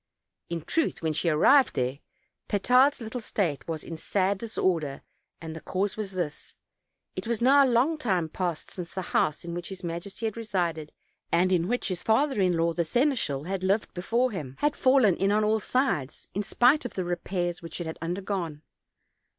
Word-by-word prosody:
In 170 -1 -3
truth, 325 - -1
when 160 -1 +1
she 165 +3 0
arrived 260 - +5
there. 130 +2 -1 0.5
Petard's 250 +7 +3
little 230 +2 -5
state 170 - -2
"Was 160 -2 -3
in 165 - -7
sad 195 +3 0
disorder, 175 -10 -1 0.4
and 160 -1 -7
the 160 - -7
cause 195 +2 -1
was 205 -3 -5
this: 170 -5 -4 0.6
It - - -5
was 235 -2 0
now 275 +3 +6
a 265 - +3
long 265 +7 +2
time 185 - 0
past 175 0 -3
since 175 -2 -7
the 190 - -2
house 155 +2 +1
in 170 - -5
which 175 0 -5
his 190 -1 -8
majesty 175 +6 -5
had 220 0 -2
resided, 175 -8 -2 0.4
and 180 +2 +3
in 175 -2 +2
which 245 0 -1
his 180 -2 -3
father 260 0 +2
in 180 -2 +2
law, 165 0 +1
the 170 - 0
seneschal, 235 - 0
had 185 +2 -3
lived 195 +3 +1
before 235 +8 0
him, 145 -10 -6
had 295 0 +1
fallen 255 -8 +4
in 195 +1 +2
on 215 +1 +3
all 215 +1 +2
sides, 210 - -1
in 205 - -1
spite 245 +8 +3
of 245 - -6
the 185 - -2
repairs 175 0 -2
which 165 0 -7
it 175 - -3
had 160 - -6
undergone. 175 -3 -3
185 Hz, 190 wpm, -27 LUFS, 165-230 Hz, 0.6 s, now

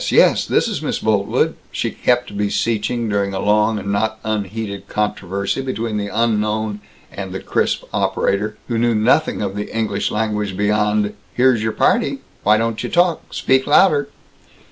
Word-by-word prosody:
Yes! - - +4
This - - +2
is - - -3
Miss - - -1
Boltwood!" 105 -2 +1 0.2
she - - -2
kept 125 -3 0
beseeching, 110 +3 -1
during 100 -2 -1
a - - -2
long 105 +2 +2
and 100 -1 -3
not 110 +2 0
unheated 105 -1 -3
controversy 100 +1 -2
between 115 -4 -3
the 100 -1 -2
unknown 110 -1 0 0.3
and 95 -1 -6
the 95 - -4
crisp - - 0
operator, 105 +2 0
who 115 -2 -1
knew 120 -1 +2
nothing 115 +3 +2
of 100 -1 -3
the 105 0 -4
English 110 -3 -1
language 105 -3 -2
beyond, 105 0 +1 0.2
"Here's 125 -2 +4
your 110 0 -1
party. - - +2 0.2
Why 105 +1 +4
don't 115 0 -1
you - - -3
talk? 175 -2 +1
Speak 130 0 +1
louder!" 145 -2 +4
105 Hz, 160 wpm, -19 LUFS, 105-115 Hz, 0.3 s, Yes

